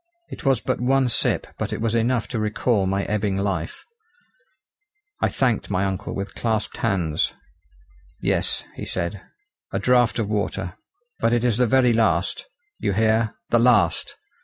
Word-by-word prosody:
It - - -8
was 135 -4 +2
but 130 -2 -2
one 130 +1 +3
sip - - +2
but - - -2
it - - -3
was 115 0 0
enough 115 +1 +1
to 120 - -2
recall 105 -1 +1
my 100 +1 0
ebbing 100 -1 -1
life. 100 - -2 1.4
I - - +4
thanked 125 -5 0
my 95 -1 +1
uncle 95 +1 -3
with 100 0 -4
clasped 110 -2 -2
hands. 85 -5 0 0.8
"Yes," - - 0
he - - -6
said, 95 +3 -3 0.5
"a - - -1
draught 125 -2 +3
of 110 -3 0
water; 100 -4 -2 0.5
but 115 +1 +2
it 120 -1 +2
is 120 -2 +1
the 125 - +4
very 125 0 +4
last 110 -1 +1 0.3
you 100 -3 0
hear! 110 +2 +2 0.2
the 120 - +5
last. 115 -9 +3
110 Hz, 160 wpm, -23 LUFS, 100-120 Hz, 1.4 s, the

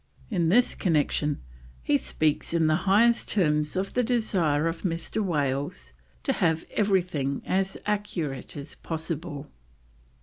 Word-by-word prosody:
In 170 -5 +2
this 240 +7 +4
connection 150 - 0 0.4
he - - +2
speaks 155 +3 0
in 165 -1 +3
the 155 0 +4
highest 230 +4 +4
terms 150 -5 +1
of 190 +1 -2
the 250 - +2
desire 195 -11 +1
of 165 0 -3
Mr. 170 +4 -2
Wales 140 - -2 0.3
to - - +1
have 160 -1 +1
everything 180 -9 0
as 190 0 0
accurate 170 -11 -3
as 140 - -7
possible. 160 -3 -5
165 Hz, 130 wpm, -27 LUFS, 150-195 Hz, 0.4 s, this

